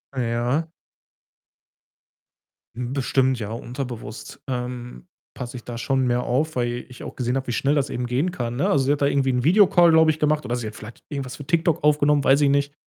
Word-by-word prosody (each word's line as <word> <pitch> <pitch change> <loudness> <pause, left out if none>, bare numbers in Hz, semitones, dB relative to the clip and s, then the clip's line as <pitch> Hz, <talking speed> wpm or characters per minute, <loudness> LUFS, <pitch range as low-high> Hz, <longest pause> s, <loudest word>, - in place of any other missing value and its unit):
Ja. 125 +6 -1 2.0
Hm, 125 +1 -4
bestimmt, 130 -1 +1
ja, 105 - -4
unterbewusst, 120 -2 -7
ähm, 125 +3 -5 0.3
passe 125 -1 -7
ich 120 - -10
da 120 -1 -7
schon 130 +1 0
mehr 120 0 +1
auf, 150 +6 -1
weil 120 -1 -2
ich 125 - -11
auch - - -8
gesehen 125 0 -1
habe, 135 - -2
wie - - -1
schnell 140 +5 +1
das 140 -2 0
eben 125 0 -3
gehen 135 +9 0
kann, 120 -7 -4
ne? 135 - +1
Also, 135 -2 +2
sie 140 - +2
hat 145 - -4
da - - +4
irgendwie 140 -1 +1
'n 125 -1 0
Videocall, 175 0 +5
glaube 160 0 +5
ich, 155 - -6
gemacht 150 0 +1
oder 120 - -1
sie 120 -3 -4
hat 110 - -8
vielleicht 110 +2 -11
irgendwas 135 -4 -5
für 145 - -10
Tik-Tok 165 -1 +1
aufgenommen, 150 -1 +3
weiß 140 +2 +4
ich 140 - +4
nicht. 140 +1 +1
130 Hz, 210 wpm, -23 LUFS, 120-145 Hz, 2.0 s, Videocall